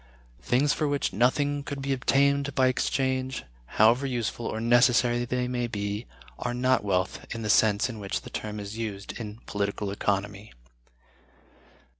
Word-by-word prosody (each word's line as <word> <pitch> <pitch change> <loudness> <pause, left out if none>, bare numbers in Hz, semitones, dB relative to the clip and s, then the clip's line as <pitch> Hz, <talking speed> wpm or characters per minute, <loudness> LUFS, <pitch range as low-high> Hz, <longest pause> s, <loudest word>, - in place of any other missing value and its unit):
Things 130 - +2
for 155 - 0
which 145 -7 -1
nothing 140 +6 +2
could 140 0 -6
be 135 0 -1
obtained 140 +2 +2
in 130 - +4
exchange, 130 0 0 0.3
however 120 +6 +5
useful 120 -2 -2
or 110 - -3
necessary 120 +1 +4
they 125 0 -1
may 125 -1 -1
be, 105 0 -4 0.3
are 120 0 -2
not 130 -1 +2
wealth 90 -3 -1
in 115 - -5
the 105 - +2
sense 105 -2 +4
in 115 -4 -7
which 100 -1 -3
the - - -11
term 105 0 -5
is 100 +1 -6
used 100 -3 -4
in 105 -2 -6
Political 100 0 -2
Economy. 100 +1 -2
120 Hz, 155 wpm, -27 LUFS, 105-130 Hz, 0.3 s, however